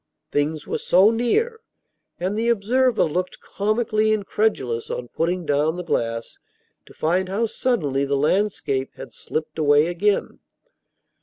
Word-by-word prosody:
Things 145 Hz, +1 st, -1 dB
were -, -, -3 dB
so 190 Hz, +5 st, +5 dB
near! 440 Hz, -, 0 dB, 0.6 s
And 185 Hz, +4 st, -1 dB
the 230 Hz, +2 st, 0 dB
observer 235 Hz, +3 st, +2 dB
looked 180 Hz, +4 st, -2 dB
comically 215 Hz, +1 st, 0 dB
incredulous, 200 Hz, -, -1 dB
on 120 Hz, -1 st, -5 dB
putting 175 Hz, +4 st, -1 dB
down 150 Hz, +2 st, +1 dB
the 180 Hz, -, -5 dB
glass, 115 Hz, -7 st, -2 dB, 0.5 s
to -, -, -15 dB
find 180 Hz, +4 st, 0 dB
how 210 Hz, +5 st, 0 dB
suddenly 160 Hz, -, 0 dB
the 140 Hz, 0 st, 0 dB
landscape 150 Hz, -4 st, 0 dB
had -, -, -10 dB
slipped 155 Hz, 0 st, -5 dB
away 145 Hz, 0 st, +4 dB
again. 195 Hz, +4 st, 0 dB
180 Hz, 135 wpm, -23 LUFS, 145-215 Hz, 0.6 s, so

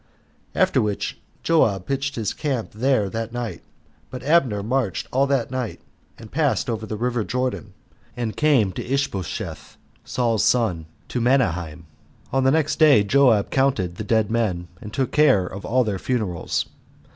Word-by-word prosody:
After -, -, +3 dB
which 105 Hz, -2 st, -2 dB, 0.2 s
Joab 105 Hz, -, +2 dB
pitched 140 Hz, +2 st, -2 dB
his 110 Hz, -4 st, -2 dB
camp 135 Hz, -7 st, -3 dB
there 115 Hz, -1 st, +1 dB
that 115 Hz, +3 st, -4 dB
night; 115 Hz, -7 st, -5 dB, 0.5 s
but 125 Hz, -, -7 dB
Abner 135 Hz, -10 st, +2 dB
marched 115 Hz, -3 st, -1 dB
all 135 Hz, +2 st, +2 dB
that 135 Hz, -4 st, 0 dB
night, 130 Hz, -4 st, -3 dB, 0.4 s
and 110 Hz, -, -12 dB
passed 145 Hz, -4 st, +1 dB
over 110 Hz, -1 st, -4 dB
the 110 Hz, -, -4 dB
river 120 Hz, 0 st, -1 dB
Jordan, 125 Hz, -4 st, -3 dB, 0.4 s
and 115 Hz, -3 st, -3 dB
came 135 Hz, -10 st, +3 dB
to -, -, -5 dB
Ishbosheth, 130 Hz, -, -3 dB, 0.3 s
Saul's 115 Hz, -3 st, 0 dB
son, 95 Hz, -10 st, +1 dB, 0.2 s
to 125 Hz, -, -2 dB
Mahanaim. 90 Hz, -, +1 dB, 0.5 s
On 135 Hz, 0 st, +2 dB
the 130 Hz, -, +4 dB
next 155 Hz, +2 st, +1 dB
day 145 Hz, -9 st, +6 dB
Joab 115 Hz, -2 st, +3 dB
counted 120 Hz, -11 st, +1 dB
the -, -, -4 dB
dead 110 Hz, 0 st, +1 dB
men, 95 Hz, -7 st, -1 dB
and 105 Hz, -, -8 dB
took 130 Hz, +2 st, -1 dB
care 145 Hz, -11 st, +4 dB
of 95 Hz, +2 st, -7 dB
all 130 Hz, +2 st, +2 dB
their 105 Hz, -4 st, -2 dB
funerals. 105 Hz, -10 st, -1 dB
115 Hz, 155 wpm, -23 LUFS, 100-135 Hz, 0.5 s, day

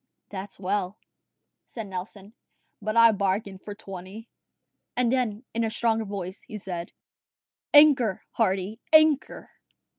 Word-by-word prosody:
"That's 195 Hz, 0 st, -7 dB
well," 195 Hz, 0 st, -2 dB, 0.7 s
said 225 Hz, -3 st, -7 dB
Nelson; 195 Hz, +2 st, -8 dB, 0.5 s
"but 215 Hz, +1 st, -2 dB
I 230 Hz, 0 st, +8 dB
bargained 195 Hz, -1 st, -2 dB
for 205 Hz, -, -8 dB
twenty." 195 Hz, +2 st, -9 dB, 0.7 s
And 245 Hz, -2 st, +3 dB
then, 245 Hz, -3 st, -1 dB
in 230 Hz, +1 st, 0 dB
a 225 Hz, -, 0 dB
stronger 225 Hz, 0 st, 0 dB
voice, 195 Hz, -2 st, -6 dB
he 215 Hz, -, -8 dB
said, 180 Hz, -3 st, -6 dB, 0.8 s
"Anchor, 285 Hz, -, +6 dB
Hardy, 195 Hz, 0 st, 0 dB
anchor." 310 Hz, -2 st, +4 dB
210 Hz, 120 wpm, -26 LUFS, 190-230 Hz, 0.8 s, I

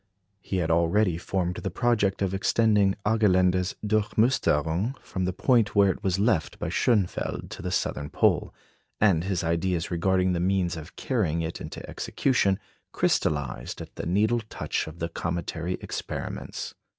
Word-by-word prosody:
He 95 Hz, -, -3 dB
had 85 Hz, -2 st, 0 dB
already 85 Hz, +2 st, +2 dB
formed 90 Hz, -1 st, -2 dB
the 95 Hz, -, -3 dB
project 100 Hz, -1 st, +1 dB
of 95 Hz, -1 st, -1 dB
extending 100 Hz, 0 st, +3 dB
Argelander's 95 Hz, -4 st, +3 dB
"Durchmusterung" 105 Hz, -, +1 dB
from 95 Hz, -1 st, -4 dB
the 90 Hz, -, 0 dB
point 110 Hz, +2 st, +2 dB
where 100 Hz, -1 st, +5 dB
it -, -, -8 dB
was 95 Hz, -1 st, +1 dB
left 100 Hz, -5 st, +1 dB
by -, -, -3 dB
Schönfeld 105 Hz, -7 st, 0 dB
to -, -, -8 dB
the -, -, -3 dB
southern 75 Hz, 0 st, -1 dB
pole; -, -, +2 dB, 0.5 s
and 95 Hz, -6 st, +4 dB
his 95 Hz, -2 st, -1 dB
ideas 85 Hz, +1 st, 0 dB
regarding 90 Hz, +1 st, +2 dB
the 85 Hz, -, -1 dB
means 90 Hz, -1 st, +1 dB
of 80 Hz, +1 st, -9 dB
carrying 85 Hz, -, 0 dB
it 80 Hz, +1 st, -5 dB
into -, -, -7 dB
execution 100 Hz, -8 st, +1 dB, 0.3 s
crystallised 70 Hz, -5 st, -1 dB
at -, -, -9 dB
the -, -, -4 dB
needle 110 Hz, +6 st, +2 dB
touch -, -, -2 dB
of 80 Hz, +1 st, -9 dB
the 85 Hz, -, -2 dB
cometary 85 Hz, +1 st, -3 dB
experiments. -, -, -5 dB
95 Hz, 150 wpm, -26 LUFS, 85-105 Hz, 0.5 s, where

